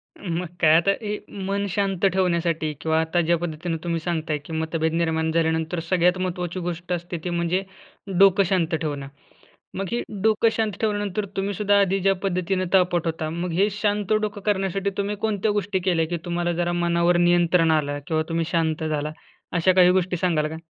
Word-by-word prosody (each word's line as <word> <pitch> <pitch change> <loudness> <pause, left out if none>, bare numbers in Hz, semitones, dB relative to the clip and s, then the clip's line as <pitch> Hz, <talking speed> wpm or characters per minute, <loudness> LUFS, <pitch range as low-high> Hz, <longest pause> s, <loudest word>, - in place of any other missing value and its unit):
मग 175 -2 -4
काय. 155 -1 +6
आता 175 +4 +4
हे 210 -1 -3 0.3
मन 200 +1 -1
शांत 195 -1 0
ठेवण्यासाठी 170 -4 0
किंवा 160 0 +1
आता 160 +2 +1
ज्या 170 +1 +2
पद्धतीनं 165 0 -3
तुम्ही 170 -1 -1
सांगताय, 160 -3 -2
की 145 +3 -10
मतभेद 160 0 -1
निर्माण 160 -1 0
झाल्यानंतर 160 +1 0
सगळ्यात 180 0 +3
महत्त्वाची 180 -1 -3
गोष्ट 175 0 -5
असते, 175 0 -4
ती 180 - -2
म्हणजे 175 +2 0 0.6
डोकं 195 0 +6
शांत 175 -3 +1
ठेवणं. 145 -3 -3 0.7
मग 195 - -2
ही 240 - 0 0.2
डोकं 220 +1 +4
शांत 220 -1 0
ठेवल्यानंतर 205 -1 -1
तुम्हीसुद्धा 200 +1 +1
आधी 195 0 +1
ज्या 195 +1 +2
पद्धतीनं 185 0 0
तापट 180 -2 +3
होता, 160 -1 -2
मग 170 +2 -3
हे 195 +5 +2
शांत 205 0 0
डोकं 210 -1 -3
करण्यासाठी 195 -1 0
तुम्ही 200 +1 -1
कोणत्या 215 -1 0
गोष्टी 205 -1 -1
केल्या? 175 -3 +1
की 175 +1 -2
तुम्हाला 175 0 -1
जरा 175 0 -1
मनावर 175 0 +2
नियंत्रण 175 -1 +3
आलं 145 -2 0
किंवा 155 -1 +1
तुम्ही 165 0 0
शांत 160 -2 0
झाला, 150 -1 -2 0.4
अशा 175 +2 +3
काही 180 -1 +6
गोष्टी 180 -1 +1
सांगाल 160 -4 +1
का? 160 - -6
175 Hz, 175 wpm, -24 LUFS, 165-195 Hz, 0.7 s, काय